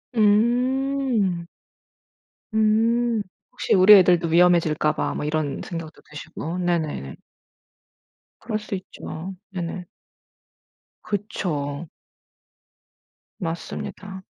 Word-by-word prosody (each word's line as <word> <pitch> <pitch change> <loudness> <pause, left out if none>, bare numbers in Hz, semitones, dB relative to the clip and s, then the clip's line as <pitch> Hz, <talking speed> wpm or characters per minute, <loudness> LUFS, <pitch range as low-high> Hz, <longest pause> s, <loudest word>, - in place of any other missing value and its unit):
음. 240 -3 +2 1.1
음. 225 +1 +2 0.3
혹시 - - -1
"우리 190 +2 +8
애들도 180 -3 +5
위험해질까봐." 165 -3 +3
뭐 - - -3
이런 150 -1 -1
생각도 165 -2 -7
드시고. 155 +3 -6
네네네. 160 - -2 1.2
그럴 220 -2 -3
수 210 -1 -5
있죠. 185 -1 -7 0.2
네네. 180 -1 -5 1.2
그쵸. 165 -7 -3 1.5
맞습니다. 190 +2 -6
185 Hz, 165 characters per minute, -23 LUFS, 165-215 Hz, 1.5 s, 우리